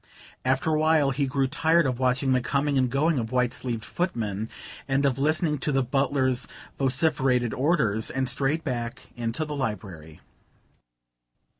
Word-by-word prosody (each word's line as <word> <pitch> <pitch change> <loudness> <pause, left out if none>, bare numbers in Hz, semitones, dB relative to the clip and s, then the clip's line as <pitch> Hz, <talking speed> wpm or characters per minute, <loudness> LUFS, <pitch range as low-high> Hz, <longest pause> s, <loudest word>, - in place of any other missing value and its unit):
After 130 +5 +1
a 155 - +2
while 155 -3 +3
he 135 +1 0
grew 135 +1 +1
tired 160 +4 +2
of 130 -2 -1
watching 130 +1 +2
the 130 - +2
coming 140 +3 0
and 130 -2 +2
going 145 +3 +1
of 115 0 -4
white 125 -1 +1
sleeved 125 -3 -4
footmen, 110 - -2 0.4
and 135 +1 +1
of 135 -1 +1
listening 155 +1 +1
to 150 - -1
the 135 -1 +2
butler's 130 0 +1 0.3
vociferated 130 -3 +2
orders, 125 -7 +1
and 130 0 -1
strayed 140 +5 0
back 120 -4 -4
into 120 +6 -2
the 150 -1 -5
library. 95 - -5
130 Hz, 155 wpm, -26 LUFS, 125-145 Hz, 0.4 s, while